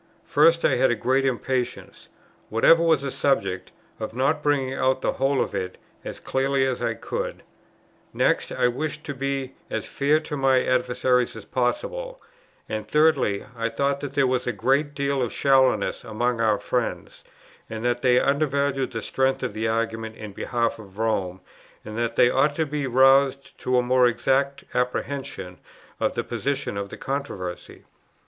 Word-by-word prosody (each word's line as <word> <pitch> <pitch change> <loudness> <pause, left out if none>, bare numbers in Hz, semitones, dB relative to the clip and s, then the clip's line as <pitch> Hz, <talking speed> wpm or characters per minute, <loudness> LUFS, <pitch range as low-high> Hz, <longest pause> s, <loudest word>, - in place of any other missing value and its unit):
First, 165 0 +4
I - - +3
had 130 +1 +4
a 120 - +2
great 130 +4 +1
impatience, 130 -1 -3 0.4
whatever 140 +9 +5
was 160 -4 +3
the 140 - -2
subject, 125 -11 0 0.3
of 110 0 -5
not 140 +4 +1
bringing 140 -3 +1
out 130 0 +1
the - - +1
whole 135 0 0
of - - -1
it, 95 -2 -4 0.3
as - - -7
clearly 135 0 0
as 130 -2 -2
I 115 -1 -1
could; - - -5 0.7
next - - +1
I - - +2
wished 150 +5 -3
to 145 - -5
be 135 -1 -3 0.2
as - - -3
fair 145 +2 +1
to 155 -1 -5
my 135 -2 +3
adversaries 125 0 +1
as - - -9
possible; - - -2 0.5
and 110 -1 -4
thirdly 150 -9 +2
I 115 0 -1
thought 140 +3 0
that 140 -1 -6
there 140 - +4
was 125 -1 0
a - - +2
great 135 +7 0
deal 140 -1 0
of 120 - -1
shallowness 130 -6 +2
among 120 +2 -1
our 110 -1 +4
own 105 - -2
friends, 125 -2 -3 0.5
and 110 +1 -5
that 120 0 +1
they 125 -1 +4
undervalued 140 -2 0
the 115 -1 -4
strength 130 0 0
of 125 - -2
the 110 +1 -2
argument 110 0 -2
in 105 -2 -8
behalf 115 +2 -1
of 100 -2 -13
Rome, 95 -5 -1 0.4
and 110 - -7
that 120 -1 -1
they 120 - +5
ought 145 +2 +2
to 160 - +1
be 145 -2 -3
roused 135 +2 +4
to 125 0 +1
a 125 - +3
more 125 0 +4
exact 135 +3 0
apprehension 125 -7 -3 0.4
of - - 0
the - - -1
position 140 -6 -2
of 100 0 -4
the - - -9
controversy. 130 -11 -5
130 Hz, 175 wpm, -24 LUFS, 115-140 Hz, 0.7 s, whatever